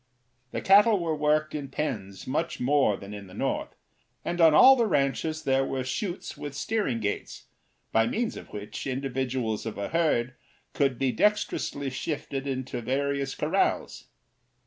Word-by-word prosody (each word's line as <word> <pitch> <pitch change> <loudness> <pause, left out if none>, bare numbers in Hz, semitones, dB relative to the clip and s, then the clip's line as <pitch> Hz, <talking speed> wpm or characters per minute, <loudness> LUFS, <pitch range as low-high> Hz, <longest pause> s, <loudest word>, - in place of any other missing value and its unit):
The - - -4
cattle 205 +2 +6
were 165 -2 -1
worked 155 +1 +1
in 145 -2 -4
pens 105 -9 -4
much 150 +6 -2
more 130 -6 +3
than 100 +1 -9
in 100 -1 -8
the 95 - -13
North, - - -2 0.5
and 175 0 -1
on 165 -1 +8
all 265 +12 +9
the 235 -3 +2
ranches 155 0 0
there 135 -2 +2
were 135 -1 -2
chutes 175 +8 -4
with 145 -1 -7
steering 205 - -1
gates, 105 -2 -4 0.5
by 115 0 +3
means 235 0 -1
of - - -9
which 105 +6 -6
individuals 130 -4 -2
of 110 - -5
a 100 - -3
herd 150 -7 +1 0.4
could 135 -3 +1
be 135 0 +1
dexterously 140 - 0
shifted 140 -1 -4
into 130 -2 -3
various 140 +2 -1
corrals. 170 +6 0
140 Hz, 155 wpm, -27 LUFS, 125-160 Hz, 0.5 s, all